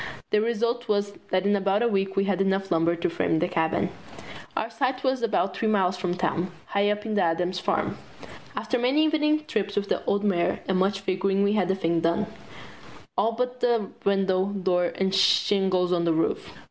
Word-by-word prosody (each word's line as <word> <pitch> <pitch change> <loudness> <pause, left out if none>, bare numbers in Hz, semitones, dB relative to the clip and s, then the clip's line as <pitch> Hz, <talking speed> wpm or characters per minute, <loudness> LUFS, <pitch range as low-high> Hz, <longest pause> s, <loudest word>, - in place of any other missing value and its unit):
The 210 - +3
result 235 +2 -1
was 205 -1 0 0.2
that 185 +1 +1
in 205 0 +3
about 200 +2 +1
a - - +3
week 195 -3 0
we 195 - +2
had 195 -1 0
enough 195 0 0
lumber 165 +1 +2
to 170 - -1
frame 165 -1 0
the 175 +3 +1
cabin. 160 -3 0 0.7
Our 220 - 0
site 255 +3 -1
was 260 -1 +1
about 200 -4 0
three 225 - -1
miles 190 -4 +2
from 180 -1 -2
town, 180 0 -1 0.2
high 200 0 +1
up 210 +1 -2
on 220 - -2
the 205 - +2
Adams 175 +2 0
Farm. - - -1 0.6
After 250 - -1
many 265 +6 +3
evening 305 0 +1
trips 205 -9 -2
with 200 -1 -1
the - - -1
old 200 +1 +1
mare 185 -4 +1
and 190 -1 +1
much 195 +1 +1
figuring 195 +1 0
we 200 +1 +2
had 200 -4 +1
the 190 - +1
thing 170 -3 0
done, 170 +6 +1 0.9
all 230 - +1
but 250 +2 -2
the 235 -4 +1
windows, 195 0 +1
door, 180 -1 +2
and 190 0 0
shingles 190 -1 +3
on 170 -1 +1
the 165 - +3
roof. 160 - -1
195 Hz, 200 wpm, -25 LUFS, 185-220 Hz, 0.9 s, The